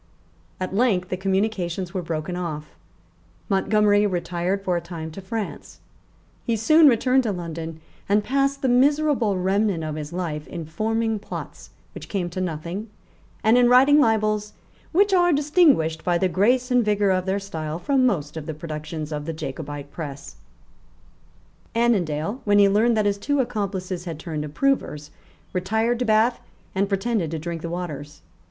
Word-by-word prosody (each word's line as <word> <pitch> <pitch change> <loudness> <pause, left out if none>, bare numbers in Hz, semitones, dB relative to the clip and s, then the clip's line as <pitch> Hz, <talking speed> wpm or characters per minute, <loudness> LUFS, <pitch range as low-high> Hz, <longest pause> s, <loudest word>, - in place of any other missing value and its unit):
At 185 0 -3
length 195 -5 +2
the - - -1
communications 190 -2 -1
were 185 - -2
broken 165 +1 -4
off. 155 -4 -5 0.8
Montgomery 205 +1 +3
retired 180 +1 -2
for 180 -2 0
a 170 - -1
time 165 -2 -7
to 195 - -8
France. 210 +2 -6 0.6
He 230 - 0
soon 310 +8 +6
returned 255 +1 +4
to 230 -4 -1
London, 165 -3 -6 0.3
and 205 +1 +3
passed 275 +3 0
the - - +3
miserable 260 -4 +3
remnant 190 -1 +1
of 155 -1 -3
his 150 -1 -6
life 165 -4 -4
in 165 -2 -6
forming 220 +6 -1
plots 205 - -8 0.2
which - - -9
came 180 -4 -2
to 185 - -3
nothing, 175 +5 -4 0.5
and 225 +3 +5
in 245 -1 +5
writing 270 +4 +6
libels 215 -4 +1 0.4
which 395 +3 +3
are 350 -1 +4
distinguished 285 - +3
by 175 -1 +2
the 185 - +2
grace 245 +8 +2
and 250 -1 +4
vigour 205 -2 +2
of 185 0 0
their 190 +1 +1
style 160 -5 -5
from 270 +7 +1
most 160 - 0
of 160 -1 -6
the 160 - -4
productions 155 -1 -6
of 150 -1 -4
the 165 - -3
Jacobite 145 -1 -6
press, 145 -4 -7 1.4
Annandale, 205 - +1
when 205 -1 +3
he 200 -1 +7
learned 220 +4 +3
that 215 - +2
his 200 0 +1
two 285 +6 0
accomplices 190 -6 -2
had 165 -3 -5
turned 155 -2 -4
approvers, 150 - -1 0.4
retired 220 +6 0
to 250 - 0
Bath, 220 +2 +3 0.3
and 195 +1 0
pretended 200 -3 0
to 160 - -3
drink 165 +1 -5
the 170 - -4
waters. 155 -4 -6
195 Hz, 165 wpm, -23 LUFS, 165-225 Hz, 1.4 s, he